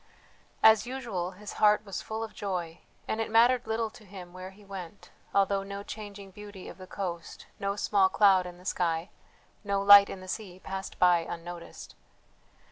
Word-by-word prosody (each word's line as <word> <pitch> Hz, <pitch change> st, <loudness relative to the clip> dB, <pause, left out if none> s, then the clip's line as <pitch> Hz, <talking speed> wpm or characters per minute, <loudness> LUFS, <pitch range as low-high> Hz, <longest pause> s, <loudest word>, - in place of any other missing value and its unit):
As 220 Hz, +1 st, +6 dB
usual 230 Hz, -9 st, -4 dB
his 205 Hz, +2 st, -9 dB
heart 210 Hz, 0 st, +5 dB
was 195 Hz, -3 st, -5 dB
full 220 Hz, +1 st, -4 dB
of 220 Hz, -, -7 dB
joy, 180 Hz, -4 st, -4 dB, 0.3 s
and 220 Hz, -, -1 dB
it 225 Hz, -, -3 dB
mattered 235 Hz, +2 st, +4 dB
little 225 Hz, 0 st, -1 dB
to -, -, -15 dB
him 185 Hz, -3 st, -11 dB
where 185 Hz, +1 st, -8 dB
he 200 Hz, +2 st, -18 dB
went, 195 Hz, -2 st, -9 dB, 0.2 s
although 195 Hz, 0 st, +2 dB
no 200 Hz, +1 st, -7 dB
changing 205 Hz, -2 st, -9 dB
beauty 205 Hz, -1 st, -10 dB
of -, -, -11 dB
the 185 Hz, -, -10 dB
coast, 175 Hz, -4 st, -6 dB
no 200 Hz, 0 st, -1 dB
small 200 Hz, -2 st, +3 dB
cloud 190 Hz, -3 st, +4 dB
in 175 Hz, 0 st, -10 dB
the 180 Hz, -, -17 dB
sky, 170 Hz, -2 st, -1 dB, 0.5 s
no 200 Hz, -1 st, 0 dB
light 200 Hz, 0 st, +9 dB
in 195 Hz, -, -6 dB
the 185 Hz, -, -11 dB
sea 185 Hz, -2 st, -6 dB
passed 190 Hz, 0 st, -6 dB
by 180 Hz, -1 st, +5 dB
unnoticed. 170 Hz, +1 st, -8 dB
195 Hz, 180 wpm, -29 LUFS, 180-210 Hz, 0.5 s, light